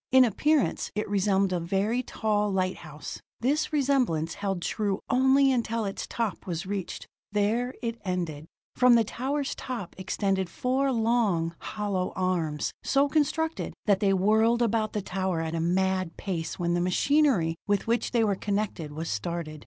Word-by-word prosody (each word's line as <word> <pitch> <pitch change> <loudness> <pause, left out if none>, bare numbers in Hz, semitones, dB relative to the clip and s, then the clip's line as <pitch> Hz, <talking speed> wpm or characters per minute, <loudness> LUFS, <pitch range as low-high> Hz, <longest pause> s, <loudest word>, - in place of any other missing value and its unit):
In 260 0 +7
appearance, 295 +6 +1
it 210 - -1
resembled 195 -1 +2
a 180 - +1
very 195 +8 0
tall 210 -4 0
lighthouse. 185 -5 -3 0.2
This 285 +6 +1
resemblance 255 - +1
held 195 -3 -3
true 205 -2 -1
only 265 +2 +5
until 230 -3 0
its 195 - -4
top 225 -6 -3
was 170 0 -3
reached; 195 -2 -4 0.3
there 220 +5 0
it 230 0 -3
ended. 170 -5 -3 0.3
From 250 -1 +6
the 230 - +5
tower's 270 +6 -2
top 240 -9 -6
extended 190 0 -1
four 265 +8 0
long, 220 -8 +1
hollow 205 -4 -2
arms, 170 -5 -1
so 280 +1 +2
constructed 315 +2 0
that 200 -2 +3
they 200 -2 +3
whirled 220 +5 +3
about 220 -1 0
the 210 - -2
tower 185 -2 -1
at 160 0 -3
a 165 - -1
mad 185 +1 0
pace 165 -5 -3
when 175 -1 0
the 175 - +1
machinery 195 - +3
with 205 -1 +1
which 235 +1 +1
they 235 -2 +2
were 205 -2 +2
connected 200 -6 -2
was 160 +2 -4
started. 155 +6 -3
205 Hz, 160 wpm, -27 LUFS, 180-240 Hz, 0.3 s, In